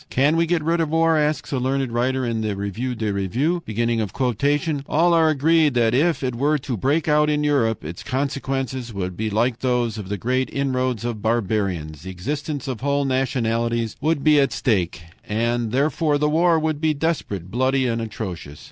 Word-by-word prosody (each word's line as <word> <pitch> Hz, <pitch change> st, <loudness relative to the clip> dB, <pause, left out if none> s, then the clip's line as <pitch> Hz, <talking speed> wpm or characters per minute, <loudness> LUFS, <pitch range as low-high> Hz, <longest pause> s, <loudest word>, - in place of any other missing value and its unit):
"Can 140 Hz, +5 st, +2 dB
we 165 Hz, 0 st, +2 dB
get 170 Hz, -2 st, +1 dB
rid 165 Hz, +2 st, +1 dB
of 160 Hz, -, 0 dB
war"? 165 Hz, +1 st, +3 dB
asks 150 Hz, 0 st, 0 dB
a 135 Hz, -, 0 dB
learned 130 Hz, 0 st, -1 dB
writer 130 Hz, +2 st, 0 dB
in 115 Hz, -2 st, -1 dB
the 105 Hz, -2 st, -2 dB
REVUE 105 Hz, +6 st, -3 dB
DES 110 Hz, -2 st, -2 dB
REVUES. 125 Hz, -, 0 dB, 1.3 s
"All 170 Hz, +3 st, +3 dB
are 165 Hz, -1 st, +4 dB
agreed 155 Hz, -1 st, +3 dB
that 115 Hz, -1 st, +3 dB
if 155 Hz, +4 st, +2 dB
it 130 Hz, -1 st, -1 dB
were 145 Hz, +6 st, +1 dB
to 140 Hz, -3 st, -4 dB
break 145 Hz, -, 0 dB
out 150 Hz, 0 st, +3 dB
in 150 Hz, 0 st, +1 dB
Europe, 120 Hz, -, +1 dB
its 85 Hz, +5 st, -6 dB
consequences 130 Hz, 0 st, -3 dB
would 95 Hz, -3 st, -4 dB
be 110 Hz, +4 st, -2 dB
like 115 Hz, +3 st, 0 dB
those 120 Hz, -4 st, 0 dB
of 100 Hz, -2 st, -7 dB
the 105 Hz, -, -2 dB
great 130 Hz, +5 st, 0 dB
inroads 130 Hz, -4 st, -1 dB
of 115 Hz, -3 st, -3 dB
barbarians. 100 Hz, -9 st, -1 dB
The 95 Hz, -, -8 dB
existence 140 Hz, -, -4 dB
of 125 Hz, -4 st, -4 dB
whole 140 Hz, +1 st, +1 dB
nationalities 115 Hz, -3 st, 0 dB
would 155 Hz, -1 st, 0 dB
be 150 Hz, -1 st, +5 dB
at 135 Hz, -, +2 dB
stake, 90 Hz, -7 st, 0 dB, 0.2 s
and 115 Hz, +1 st, -1 dB
therefore 145 Hz, +3 st, +1 dB
the 150 Hz, +1 st, +1 dB
war 165 Hz, +2 st, +3 dB
would 155 Hz, -1 st, -1 dB
be 155 Hz, -1 st, +2 dB
desperate, 135 Hz, -, -2 dB
bloody, 130 Hz, +2 st, +1 dB
atrocious. 110 Hz, -, -4 dB
130 Hz, 185 wpm, -22 LUFS, 110-150 Hz, 1.3 s, be